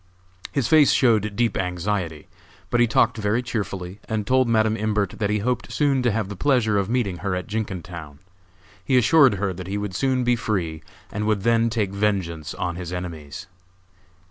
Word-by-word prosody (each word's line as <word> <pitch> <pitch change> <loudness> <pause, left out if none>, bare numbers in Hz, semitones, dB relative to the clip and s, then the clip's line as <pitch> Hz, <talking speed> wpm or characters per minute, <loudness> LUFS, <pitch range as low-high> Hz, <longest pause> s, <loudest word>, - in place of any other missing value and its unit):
His 140 -4 0
face 155 -3 +6
showed 105 -5 +2
deep 115 -2 +1
anxiety, 90 -3 -2 0.4
but 120 - +2
he 120 - +5
talked 115 +1 +2
very 110 +3 0
cheerfully 100 -5 -4
and 110 -2 -1
told 130 +1 +3
Madam 110 -1 +3
Imbert 105 -3 0
that 100 - 0
he 105 - +1
hoped 125 -1 -1
soon 140 -3 +2
to 125 - +2
have 105 -1 -1
the 100 - -6
pleasure 110 -4 +2
of 100 0 -2
meeting 115 -7 0
her 100 0 -2
at 90 - -3
Jenkintown. 85 -8 -5 0.7
He 130 +7 +2
assured 135 -1 +5
her 100 0 -1
that 90 0 -8
he 100 +2 -2
would 105 -2 -4
soon 130 +4 +1
be 120 0 +3
free 90 -9 -2 0.3
and 105 +1 -2
would 105 -3 +1
then 115 0 +3
take 110 -4 -1
vengeance 95 -6 -1
on 90 -2 -3
his 90 -1 -6
enemies. 85 -5 -6
105 Hz, 185 wpm, -23 LUFS, 90-115 Hz, 0.7 s, face